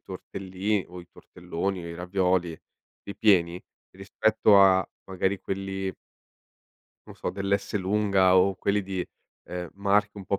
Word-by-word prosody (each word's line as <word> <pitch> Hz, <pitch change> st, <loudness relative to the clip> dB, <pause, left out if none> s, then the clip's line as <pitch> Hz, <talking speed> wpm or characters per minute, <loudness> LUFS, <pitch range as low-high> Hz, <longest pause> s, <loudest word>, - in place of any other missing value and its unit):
tortelli 95 Hz, +1 st, -4 dB
o 90 Hz, +1 st, -9 dB
i 85 Hz, -, -16 dB
tortelloni 90 Hz, +1 st, -5 dB
o -, -, -7 dB
i 85 Hz, -, -7 dB
ravioli, 90 Hz, -1 st, 0 dB, 0.5 s
ripieni, 90 Hz, -4 st, +2 dB, 0.3 s
rispetto 105 Hz, +2 st, +2 dB
a 95 Hz, -1 st, +5 dB, 0.2 s
magari 95 Hz, +1 st, -1 dB
quelli 95 Hz, 0 st, -4 dB, 1.1 s
non -, -, -12 dB
so -, -, -4 dB
dell'Esselunga 100 Hz, -1 st, +1 dB
o 95 Hz, +1 st, +3 dB
quelli 100 Hz, +2 st, 0 dB
di, 95 Hz, -2 st, -4 dB, 0.4 s
ehm, 90 Hz, -1 st, -6 dB
marche 100 Hz, +1 st, +1 dB
un 100 Hz, -, -9 dB
po' 100 Hz, -, 0 dB
95 Hz, 125 wpm, -26 LUFS, 90-100 Hz, 1.1 s, a